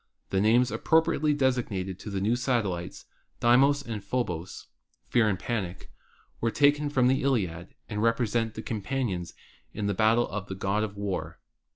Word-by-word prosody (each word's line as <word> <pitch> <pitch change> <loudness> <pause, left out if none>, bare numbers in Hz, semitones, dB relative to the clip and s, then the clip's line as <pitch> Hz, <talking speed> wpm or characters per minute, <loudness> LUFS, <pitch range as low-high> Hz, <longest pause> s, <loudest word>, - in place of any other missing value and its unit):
The 95 - +2
names 120 +3 +4
appropriately 155 +4 +2
assigned 105 -8 0
to 105 - -7
the 100 -1 -2
new 105 +5 +1
satellites, 115 -9 -2 0.3
Deimos 135 +4 +4
and 115 -5 -5
Phobos 95 -8 -3 0.4
(Fear 115 -3 +3
and 100 - 0
Panic), 95 -5 -4 0.5
were 115 - +1
taken 145 +3 +3
from 130 -3 +2
the 130 +1 +2
Iliad 95 -10 -1
and 105 0 -3
represent 115 -1 +1
the 110 - -6
companions 105 -5 -3 0.4
in 105 - -3
battle 110 +4 +3
of 105 0 -5
the 95 - -5
God 95 +2 0
of 105 -2 -4
War. 90 -5 -3
110 Hz, 155 wpm, -27 LUFS, 95-125 Hz, 0.5 s, names